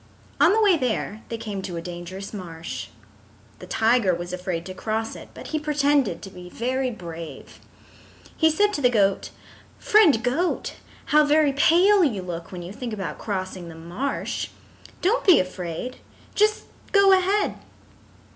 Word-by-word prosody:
On - - +6
the 435 - +3
way 390 -5 +5
there 225 -5 -2
they 230 - -3
came 210 -3 -5
to 180 -3 -5
a - - -2
dangerous 180 +3 -7
marsh. 165 -5 -6 0.7
The - - -10
tiger 225 -5 +2
was 175 +1 -6
afraid 180 -2 -3
to 185 - -6
cross 220 +3 -3
it, - - -11
but - - -9
he 310 - -1
pretended 285 - +1
to 195 - -8
be 180 -1 -11
very 255 +5 -1
brave. 170 -7 -9 0.8
He 320 - +4
said 410 +6 +2
to 290 - -2
the 250 - +5
goat: 200 -5 +1 0.5
"Friend 340 - +4
Goat, 315 +9 0 0.4
how 300 0 +7
very 295 -1 +3
pale 365 +7 +5
you 215 - 0
look 170 -2 -6
when 180 -2 -7
you 180 +3 -8
think 245 -1 -5
about 195 -3 -5
crossing 185 -3 -4
the 165 - -10
marsh. 175 +12 -3 0.6
Don't 430 +7 +2
be 370 - +7
afraid. 185 +6 -4 0.4
Just 425 +1 +2 0.3
go 395 -1 +6
ahead." 390 +2 +1
225 Hz, 160 wpm, -24 LUFS, 180-300 Hz, 0.8 s, how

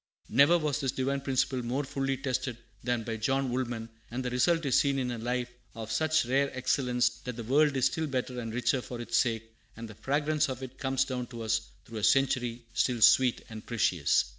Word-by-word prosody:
Never 140 +9 +5
was 150 -3 -1
this 135 -2 0
divine 135 +1 -1
principle 130 -1 0
more 125 +4 -2
fully 135 0 -2
tested 130 -2 -2 0.3
than 120 -1 0
by 115 0 -4
John 135 +4 0
Wool 130 +1 0
man; 115 -2 -5 0.2
and 125 +2 -4
the 125 - -2
result 165 +6 +2
is 135 - +2
seen 140 -1 +1
in 125 -2 -1
a 120 - -4
life 125 +1 -2 0.2
of 110 -1 -6
such 155 +4 +2
rare 135 +3 +2
excellence 125 -1 +2 0.2
that 125 -2 -4
the 120 - -6
world 140 +4 +3
is 130 - +2
still 160 -1 0
better 125 -2 -3
and 115 -2 -5
richer 120 +2 +1
for 120 0 -7
its 120 -1 -3
sake, 115 -2 0 0.2
and 115 0 -7
the 110 - -10
fragrance 145 +6 0
of 130 0 -5
it 130 0 -9
comes 135 -1 +1
down 125 -2 -4
to 115 -1 -7
us 110 0 +1 0.2
through 115 -1 -7
a - - -7
century, 125 -1 +2
still 125 -2 +1
sweet 115 +3 +5
and 110 -1 -8
precious. 90 - +2
125 Hz, 215 wpm, -29 LUFS, 115-135 Hz, 0.3 s, Never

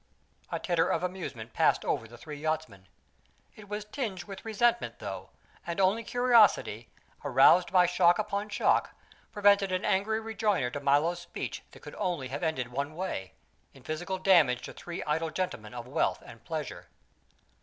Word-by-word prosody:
A - - -1
titter 170 -2 +1
of - - 0
amusement 170 -11 -5
passed - - +2
over 115 - -1
the 120 +2 -13
three 150 +2 -8
yachtsmen. 155 -12 -3 0.7
It 210 -2 -14
was 210 0 -4
tinged 210 -6 -4
with 195 +1 -9
resentment, 235 +2 +1
though, - - -7 0.4
and 170 +2 -3
only 195 +4 +3
curiosity, 230 - +3 0.3
aroused 180 +1 +5
by 180 -1 +6
shock 175 0 +4
upon 210 0 -2
shock, - - +1 0.4
prevented 200 -2 +4
an 185 0 -1
angry 215 +3 +1
rejoinder 210 - 0
to 145 - -4
Milo's 145 +5 +2
speech 175 0 -6
that - - -16
could - - -9
only 160 -8 -2
have 135 - -4
ended 160 -8 -1
one 140 +4 -3
way: 170 - -4 0.4
in 135 - -16
physical 175 +6 -3
damage 165 -10 +4
to - - -7
three 175 -1 -6
idle 160 +2 -1
gentlemen 155 - -4
of 120 0 -7
wealth 145 +5 0
and 115 -1 -13
pleasure. 155 +2 -5
175 Hz, 165 wpm, -29 LUFS, 140-200 Hz, 0.7 s, by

